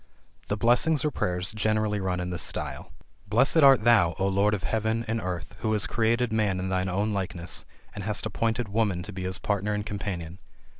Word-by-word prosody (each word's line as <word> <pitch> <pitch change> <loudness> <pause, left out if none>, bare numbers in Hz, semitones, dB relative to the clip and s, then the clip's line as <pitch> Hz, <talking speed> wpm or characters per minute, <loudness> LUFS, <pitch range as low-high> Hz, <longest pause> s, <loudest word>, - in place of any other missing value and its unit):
The 105 - -1
blessings 125 +7 +3
or 150 - +1
prayers 90 -5 -2
generally 110 0 0
run 90 -1 -1
in 90 0 -3
this 85 -2 -4
style: - - -3 0.4
"Blessed 130 - +3
art 135 -7 +7
thou, 105 -8 +4
O 95 +1 +1
Lord 100 +2 +2
of 95 - -7
heaven, 110 +1 -1
and 110 +1 -1
earth, 90 -3 -5
who 110 - 0
has 105 -1 +1
created 115 +1 +1
man 105 -4 +1
in 95 0 -2
thine 95 0 0
own 100 +4 0
likeness, 90 -3 -4 0.3
and 100 - -6
hast 105 0 -2
appointed 115 +1 -1
woman 100 -4 0
to 100 - -8
be 95 - -6
his 95 +1 -2
partner 105 +1 -1
and 105 0 -3
companion! 95 -4 -5
105 Hz, 200 wpm, -27 LUFS, 95-110 Hz, 0.4 s, art